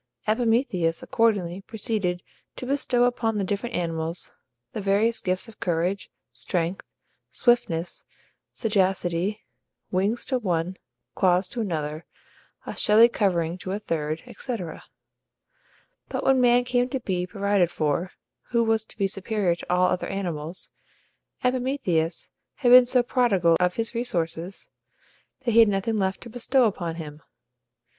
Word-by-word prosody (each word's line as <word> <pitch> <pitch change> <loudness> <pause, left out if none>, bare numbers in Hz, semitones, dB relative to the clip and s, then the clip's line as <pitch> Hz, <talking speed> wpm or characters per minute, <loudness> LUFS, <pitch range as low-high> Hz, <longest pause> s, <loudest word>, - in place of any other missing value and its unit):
Epimetheus 225 -7 +1
accordingly 205 -7 +1
proceeded 205 -4 -2 0.3
to - - -5
bestow 255 -2 +1
upon 230 -3 +1
the 200 - 0
different 205 +5 -3
animals 165 0 -3 0.4
the 215 - -3
various 205 +4 +2
gifts 185 +4 -1
of 225 - -15
courage, 175 +3 -1 0.2
strength, 170 +9 -2 0.5
swiftness, 180 -9 +1 0.5
sagacity; 195 -2 0 0.5
wings 200 +6 0
to 260 -2 0
one, 180 -4 -1 0.4
claws 180 0 +3
to 235 - -3
another, 155 -5 -3 0.6
a - - -6
shelly 220 +3 +6
covering 180 -6 0
to 185 - -5
a - - -1
third, 160 -6 -3
etc. 220 -11 -5 1.3
But - - -3
when 265 -1 +4
man 245 0 +5
came 245 0 +1
to 265 - -2
be 180 -6 -2
provided 200 -2 +1
for, 165 +2 -1 0.4
who 235 -1 +2
was 225 -1 +2
to - - -5
be 200 - +1
superior 195 -1 +1
to 170 - -7
all 180 +1 +4
other 180 - 0
animals, 175 -3 -3 0.7
Epimetheus 250 - 0 0.2
had 245 -3 +2
been 250 0 +9
so 250 0 +3
prodigal 200 -10 +3
of 180 0 +1
his 230 0 -1
resources 180 -6 -3 0.7
that 250 -3 0
he 230 - +5
had 225 -2 +7
nothing 205 +2 0
left 190 0 -1
to 240 - -9
bestow 250 +2 +2
upon 175 -7 -1
him. 155 -2 -8
195 Hz, 135 wpm, -25 LUFS, 175-235 Hz, 1.3 s, been